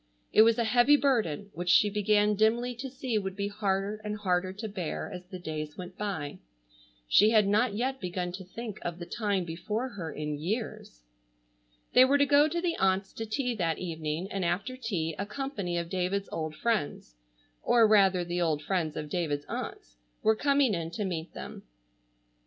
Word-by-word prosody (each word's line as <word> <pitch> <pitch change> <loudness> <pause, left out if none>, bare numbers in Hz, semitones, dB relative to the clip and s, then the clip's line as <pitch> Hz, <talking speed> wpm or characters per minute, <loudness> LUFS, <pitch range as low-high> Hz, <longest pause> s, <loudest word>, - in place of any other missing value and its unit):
It - - +8
was 225 0 +5
a 235 - +2
heavy 245 +6 +5
burden 210 - 0
which 175 +1 -3
she 210 +3 +6
began 210 0 +2
dimly 230 +4 +2
to 260 +3 -6
see 255 -4 -2
would 190 -2 -4
be 200 0 -2
harder 200 0 -1
and 210 0 -3
harder 185 -2 0
to 205 +4 -6
bear 195 -1 -4
as 180 0 -8
the 185 - -7
days 155 -3 -5
went 180 0 -8
by. 185 -9 -4 0.7
She 210 - +6
had 215 -3 +4
not 210 +2 +2
yet 260 +4 -1
begun 180 -1 -3
to 190 +2 -7
think 215 +3 -7
of 170 -1 -4
the 175 - -7
time 200 0 -1
before 210 +9 -3
her 180 -8 -6
in 150 -1 -4
years. 175 - -4 0.9
They 255 - +8
were 275 +2 +4
to 285 - +4
go 290 +1 +5
to 340 +3 -2
the 340 -1 0
aunts' 190 0 +1
to 225 - -5
tea 250 +3 -1
that 165 -4 0
evening, 160 0 -3
and 195 -1 -2
after 180 +9 -1
tea 190 -10 -2
a 200 - -1
company 210 -8 -3
of 170 0 -2
David's 190 +2 -1
old 155 -1 -3
friends—or - - 0
rather 195 -4 +4
the 175 +1 -2
old 155 -3 0
friends 165 -2 -1
of 150 - -4
David's 145 -3 -2
aunts—were - - -3
coming 280 -1 +3
in 165 -3 -2
to 205 +5 -3
meet 170 -3 -4
them. - - -7
195 Hz, 185 wpm, -29 LUFS, 170-220 Hz, 0.9 s, It